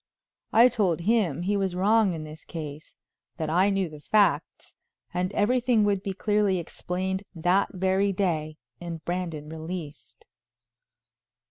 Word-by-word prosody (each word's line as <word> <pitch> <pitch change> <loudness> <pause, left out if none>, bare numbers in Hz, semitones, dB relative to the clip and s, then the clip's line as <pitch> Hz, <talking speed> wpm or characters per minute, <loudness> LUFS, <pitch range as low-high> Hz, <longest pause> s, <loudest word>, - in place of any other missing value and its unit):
I 235 +2 +7
told 200 -9 0
him 180 -6 +1
he 200 +3 +1
was 190 -3 -1
wrong 205 +1 +3
in 160 -2 -5
this 155 0 -10
case; 155 -2 -8 0.4
that 155 -1 -2
I 185 +4 +4
knew 195 -2 0
the 155 -2 -11
facts, 170 -3 +1 0.4
and 180 +1 -1
everything 240 +2 +2
would 200 -2 +1
be 195 0 -3
clearly 205 -1 +1
explained 185 +2 -3
that 180 +4 +2
very 190 +1 +1
day 160 -5 -1 0.2
and 170 -2 -7
Brandon 170 -4 -3
released. 160 -1 -8
185 Hz, 135 wpm, -26 LUFS, 160-200 Hz, 0.4 s, I